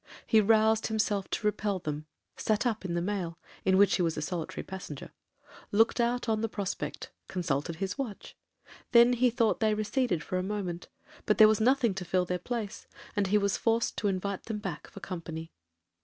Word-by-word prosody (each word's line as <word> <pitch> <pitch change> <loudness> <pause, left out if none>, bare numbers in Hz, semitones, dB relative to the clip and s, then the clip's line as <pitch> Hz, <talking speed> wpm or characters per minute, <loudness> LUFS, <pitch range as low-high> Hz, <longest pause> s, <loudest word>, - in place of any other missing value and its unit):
He 220 - +5
roused 220 +1 +4
himself 210 -3 0
to 220 - -3
repel 210 -1 0
them,—sat 155 - -3
up 225 -4 0
in 175 -2 -2
the 170 - 0
mail, 180 -4 -2 0.3
in 190 0 +4
which 200 0 +5
he - - 0
was 165 -2 0
a - - -1
solitary 165 0 -4
passenger,—looked 190 - -3
out 240 +1 0
on 220 -1 +1
the 225 - -1
prospect,—consulted 175 -5 -3
his 195 - -4
watch;—then 240 0 0
he 250 +1 +3
thought 230 -2 +1
they 215 -1 +2
receded 215 - 0
for 185 - -2
a - - 0
moment,—but 195 +1 -4
there 215 - +9
was 215 0 +2
nothing 250 -2 +3
to 190 -1 -4
fill 180 +1 +1
their 180 0 -2
place, 225 +1 -5 0.3
and 205 -2 +1
he 210 +3 +4
was 200 -1 +1
forced 230 0 +1
to 210 - 0
invite 195 0 -2
them 220 -2 -3
back 195 -7 -5
for 200 - -11
company. 165 -3 -6
205 Hz, 175 wpm, -30 LUFS, 180-220 Hz, 0.3 s, there